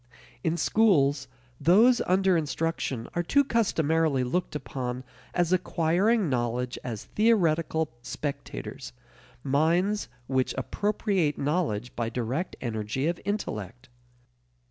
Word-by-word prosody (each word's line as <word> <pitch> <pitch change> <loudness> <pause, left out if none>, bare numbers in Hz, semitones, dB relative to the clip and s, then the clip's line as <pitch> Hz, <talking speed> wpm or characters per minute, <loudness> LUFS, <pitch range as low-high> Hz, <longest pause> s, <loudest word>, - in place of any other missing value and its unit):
In 165 +1 0
schools, 145 -9 +3 0.3
those 225 +9 +5
under 190 0 +3
instruction 145 -5 -2
are 175 - 0
too 280 - +3
customarily 160 - +1
looked 165 +7 -2
upon 130 -3 -4 0.3
as 175 0 +1
acquiring 185 +4 +2
knowledge 125 -1 -1
as 115 -4 -5
theoretical 165 - +2
spectators, 140 - -6 0.5
minds 170 +9 +1 0.2
which 130 0 0
appropriate 195 - 0
knowledge 140 - -1
by 115 -1 -1
direct 125 +9 -3
energy 110 +2 -2
of 170 +1 -1
intellect. 125 - -4
155 Hz, 100 wpm, -27 LUFS, 130-185 Hz, 0.5 s, those